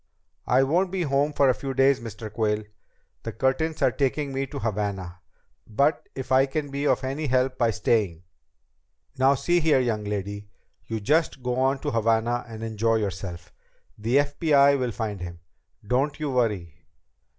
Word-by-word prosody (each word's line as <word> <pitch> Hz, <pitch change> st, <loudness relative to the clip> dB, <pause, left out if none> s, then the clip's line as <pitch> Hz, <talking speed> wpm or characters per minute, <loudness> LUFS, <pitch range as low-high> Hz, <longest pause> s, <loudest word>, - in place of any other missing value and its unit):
"I 130 Hz, +2 st, +4 dB
won't 175 Hz, +7 st, +1 dB
be 185 Hz, -1 st, -1 dB
home 140 Hz, 0 st, +1 dB
for 140 Hz, -1 st, +3 dB
a 130 Hz, -, +5 dB
few 135 Hz, +1 st, -5 dB
days, 135 Hz, 0 st, +4 dB
Mr. 110 Hz, -2 st, -8 dB
Quayle. 105 Hz, -1 st, 0 dB, 0.6 s
The 115 Hz, -, -5 dB
Curtins 135 Hz, +8 st, 0 dB
are -, -, +4 dB
taking 140 Hz, 0 st, -1 dB
me 135 Hz, +1 st, -2 dB
to 140 Hz, -, -7 dB
Havana. 100 Hz, -6 st, -3 dB, 0.5 s
But 140 Hz, +8 st, +1 dB
if 130 Hz, -1 st, -6 dB
I 135 Hz, +1 st, +5 dB
can 145 Hz, +1 st, -3 dB
be 140 Hz, +1 st, -1 dB
of 130 Hz, -, +2 dB
any 140 Hz, +4 st, -2 dB
help 130 Hz, 0 st, +1 dB
by 120 Hz, -2 st, +3 dB
staying 105 Hz, -5 st, 0 dB, 0.5 s
..." -, -, -41 dB
"Now 135 Hz, +2 st, +5 dB
see 175 Hz, +6 st, +1 dB
here, 155 Hz, -4 st, +3 dB
young 115 Hz, -4 st, -1 dB
lady. 100 Hz, 0 st, -4 dB, 0.4 s
You 110 Hz, -1 st, -3 dB
just 150 Hz, +2 st, +1 dB
go 125 Hz, 0 st, -1 dB
on 135 Hz, +1 st, +2 dB
to -, -, -2 dB
Havana 115 Hz, +1 st, +1 dB
and 110 Hz, -1 st, -8 dB
enjoy 115 Hz, 0 st, 0 dB
yourself. 95 Hz, -5 st, -4 dB, 0.4 s
The 115 Hz, +5 st, +1 dB
FBI 145 Hz, -1 st, +4 dB
will 125 Hz, -1 st, 0 dB
find 105 Hz, -4 st, -4 dB
him, 85 Hz, -1 st, -7 dB, 0.5 s
don't 135 Hz, +7 st, 0 dB
you 150 Hz, -2 st, -2 dB
worry." 105 Hz, -, -1 dB
125 Hz, 175 wpm, -25 LUFS, 110-140 Hz, 0.6 s, a